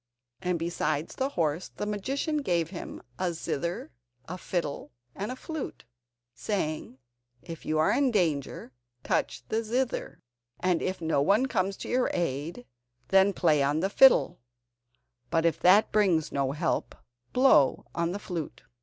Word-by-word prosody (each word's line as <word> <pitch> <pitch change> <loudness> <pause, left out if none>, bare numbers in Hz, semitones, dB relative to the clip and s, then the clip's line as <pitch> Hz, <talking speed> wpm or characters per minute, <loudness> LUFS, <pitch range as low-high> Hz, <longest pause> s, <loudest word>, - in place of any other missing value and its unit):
And 180 -2 0
besides 165 -2 -2
the 265 0 -1
horse, 165 - -1
the - - -2
magician 270 - -2
gave 175 - 0
him 180 - -8 0.2
a 180 -2 0
zither, 165 0 -3 0.4
a 180 - -5
fiddle, 165 -5 -4 0.2
and 205 +5 -4
a - - -4
flute, 315 +2 -6 0.5
saying: 155 - -3 0.5
"If 165 -2 -9
you 155 - +1
are 155 - +3
in 275 +1 +3
danger, 160 - -1 0.3
touch - - -1
the 225 +1 0
zither; 245 +3 -2 0.4
and 180 -2 +1
if 185 -1 -3
no 160 -3 +1
one 205 - +3
comes 195 -6 -1
to - - -7
your 250 0 +1
aid, 145 -4 -3 0.4
then 195 +1 +5
play 160 -6 +2
on 145 +3 +1
the 195 +2 0
fiddle; 265 -9 +5 0.9
but 165 0 +1
if 165 -3 +2
that 195 +4 +5
brings 185 -7 +2
no 135 -1 0
help, 160 +3 -1 0.4
blow 250 - +4
on 170 0 -1
the 195 - -3
flute." 175 -6 -6
175 Hz, 150 wpm, -28 LUFS, 160-210 Hz, 0.9 s, then